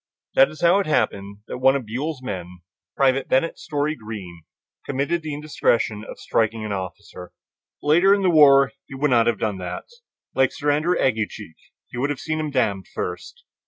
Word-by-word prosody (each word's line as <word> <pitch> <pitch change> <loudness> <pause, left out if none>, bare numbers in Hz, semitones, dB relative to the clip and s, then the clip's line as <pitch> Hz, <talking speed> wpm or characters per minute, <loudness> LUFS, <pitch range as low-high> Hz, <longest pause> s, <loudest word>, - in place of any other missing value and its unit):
That - - +6
is - - -12
how 175 +3 +5
it 200 - -1
happened 100 -8 -1
that - - -6
one 135 +1 +4
of 135 -4 -3
Buell's 130 +5 -4
men, 90 -6 -6 0.4
Private 135 -1 +2
Bennett 135 +6 +1
Story 150 +1 -1
Greene, 100 - -9 0.4
committed 140 +5 -1
the 155 -1 -5
indiscretion 115 -7 0
of - - -9
striking 110 0 0
his 105 - -4
officer. 95 -1 -7 0.5
Later 175 +6 +5
in 200 0 +3
the 185 - +4
war 140 -4 +6 0.2
he 135 - -9
would 145 +1 0
not 115 -2 +4
have 120 -2 +2
done 105 -3 -2
that; 90 -1 -6 0.5
like 130 -1 +2
Sir 145 -2 0
Andrew 155 +5 +1
Aguecheek, 110 - -1 0.3
he - - -10
would 140 +3 0
have 145 -3 -3
"seen 155 +1 -3
him 155 -1 -2
damned" 110 -9 0
first. 485 0 -6
130 Hz, 185 wpm, -23 LUFS, 105-150 Hz, 0.5 s, That